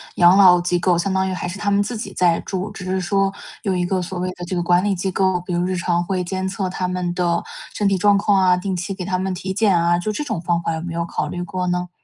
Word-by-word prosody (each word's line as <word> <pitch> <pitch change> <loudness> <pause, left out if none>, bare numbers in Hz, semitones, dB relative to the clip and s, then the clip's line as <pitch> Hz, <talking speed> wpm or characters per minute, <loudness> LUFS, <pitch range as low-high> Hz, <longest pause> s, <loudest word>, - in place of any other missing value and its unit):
养 175 +2 +6
老 180 -3 +7
机 175 0 0
构。 180 -1 +2
相 190 +3 -1
当 190 0 +1
于 - - -2
还 180 - -4
是 190 +3 -7
他 205 - 0
们 200 0 +3
自 230 +3 -4
己 215 - -6
在 175 -2 +2
住， 190 +2 -4
只 195 -3 -8
是 185 0 -1
说 195 +1 +1 0.3
有 195 -4 0
一 180 -1 0
个 185 +1 0
所 180 +1 -5
谓 185 +1 -1
的 175 - -6
这 185 - -4
个 175 - 0
管 175 +1 +3
理 205 -1 +1
机 190 +1 -2
构， 190 -1 +1
比 180 0 -5
如 175 0 +1
日 185 0 -1
常 175 -1 0
会 185 0 -1
监 190 +1 -3
测 190 -1 -2
他 180 0 -2
们 180 -1 -2
的 175 -1 0 0.3
身 205 - 0
体 195 - +1
状 205 +1 +4
况 200 -1 +3
啊、 185 -1 +4
定 190 +1 -3
期 185 +3 -3
给 190 - -6
他 185 0 -1
们 190 0 -2
体 190 +1 -4
检 200 -2 +3
啊， 170 +1 +2
就 215 +5 -2
这 265 - -3
种 220 - -3
方 170 0 0
法 165 - -2
有 160 - -4
没 170 -1 -5
有 170 0 -2
考 - - -3
虑 175 - -5
过 180 +1 -3
呢？ 180 0 -1
185 Hz, 325 characters per minute, -21 LUFS, 175-195 Hz, 0.3 s, 老